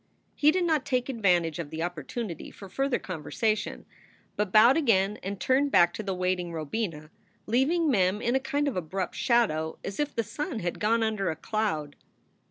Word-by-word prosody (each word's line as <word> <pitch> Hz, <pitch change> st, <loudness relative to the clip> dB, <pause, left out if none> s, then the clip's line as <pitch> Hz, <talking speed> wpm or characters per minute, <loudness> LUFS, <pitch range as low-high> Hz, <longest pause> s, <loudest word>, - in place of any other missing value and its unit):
He 295 Hz, -, +4 dB
did 360 Hz, +3 st, +2 dB
not 315 Hz, -4 st, +1 dB
take 255 Hz, -1 st, -1 dB
advantage 180 Hz, -, +1 dB
of 160 Hz, -4 st, -4 dB
the 160 Hz, +2 st, -4 dB
opportunity 175 Hz, -, -5 dB
for 195 Hz, -, -11 dB
further 270 Hz, +5 st, 0 dB
conversation, 185 Hz, +6 st, -2 dB, 0.5 s
but 210 Hz, -2 st, -1 dB
bowed 225 Hz, +5 st, +7 dB
again 210 Hz, -9 st, +2 dB
and 195 Hz, 0 st, -5 dB
turned 265 Hz, +7 st, +2 dB
back 175 Hz, -2 st, +5 dB
to -, -, -4 dB
the 195 Hz, -3 st, -3 dB
waiting 180 Hz, -1 st, -1 dB
Robina, 160 Hz, -1 st, -4 dB, 0.3 s
leaving 285 Hz, +9 st, +2 dB
Mem 195 Hz, -6 st, +2 dB
in 235 Hz, +2 st, 0 dB
a 265 Hz, -, +3 dB
kind 285 Hz, +2 st, -1 dB
of 280 Hz, -, -1 dB
abrupt 185 Hz, +2 st, -3 dB
shadow, 160 Hz, -10 st, +1 dB
as 195 Hz, -, -6 dB
if 295 Hz, -1 st, -1 dB
the 230 Hz, -, +1 dB
sun 265 Hz, -, -4 dB
had 175 Hz, -1 st, -3 dB
gone 225 Hz, +2 st, +2 dB
under 215 Hz, -3 st, 0 dB
a 160 Hz, -, -2 dB
cloud. 160 Hz, -5 st, -2 dB
210 Hz, 180 wpm, -28 LUFS, 175-250 Hz, 0.5 s, bowed